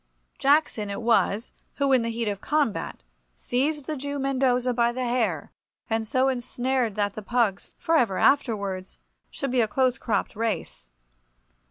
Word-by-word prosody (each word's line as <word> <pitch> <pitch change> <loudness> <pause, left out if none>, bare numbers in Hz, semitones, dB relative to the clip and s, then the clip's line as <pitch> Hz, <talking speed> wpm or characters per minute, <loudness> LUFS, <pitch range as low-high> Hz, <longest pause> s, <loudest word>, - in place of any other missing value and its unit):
Jackson 275 -7 +2
it 200 +3 -4
was 225 -1 +2 0.2
who, 280 -1 +1
in 255 - +5
the 230 - -2
heat 230 0 -2
of 200 -1 -3
combat, 295 -8 -1 0.3
seized 280 - -1
the 310 - -3
Jew 285 +1 -4
Mendoza 260 -2 +1
by 235 0 +2
the 255 +1 -3
hair, 230 - -1 0.4
and 225 0 0
so 255 +4 +2
ensured 250 -2 -1
that 205 -1 0
the 215 - -6
pugs 215 -3 0
for 330 - +1
ever 225 -11 +2
afterwards 200 -9 +1 0.3
should 275 -2 -4
be 250 -1 +3
a 220 - +2
close 255 +3 +1
cropped 210 -5 -1
race. 220 - -3
245 Hz, 160 wpm, -26 LUFS, 215-265 Hz, 0.4 s, in